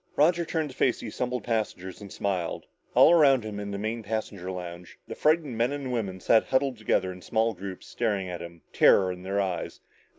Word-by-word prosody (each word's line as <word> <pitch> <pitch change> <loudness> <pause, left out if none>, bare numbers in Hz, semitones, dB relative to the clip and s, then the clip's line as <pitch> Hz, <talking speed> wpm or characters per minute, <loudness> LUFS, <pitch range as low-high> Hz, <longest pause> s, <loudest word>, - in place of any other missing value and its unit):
Roger 170 +4 +4
turned 160 -3 -2
to - - -14
face 125 - +2
the - - -6
assembled 125 +3 -3
passengers 105 -5 -3
and 100 -2 -10
smiled. 95 -4 -2 0.3
All - - +8
around 140 -7 +5
him 105 -1 -5
in 100 0 -5
the 100 - -4
main 110 +3 -3
passenger 105 -4 -4
lounge, 90 -1 -7
the - - -5
frightened 155 -4 +1
men 120 +3 +1
and 140 -3 -4
women 100 -6 -2
sat 110 +4 +4
huddled 130 -2 0
together 95 -3 +1
in 90 - -12
small 110 +2 +1
groups, 95 0 -8
staring 105 -5 -1
at 90 -1 -5
him, 85 -1 -10
terror 95 -2 +5
in 90 0 -8
their 95 +2 -2
eyes. 95 -3 -2
110 Hz, 205 wpm, -27 LUFS, 95-125 Hz, 0.3 s, All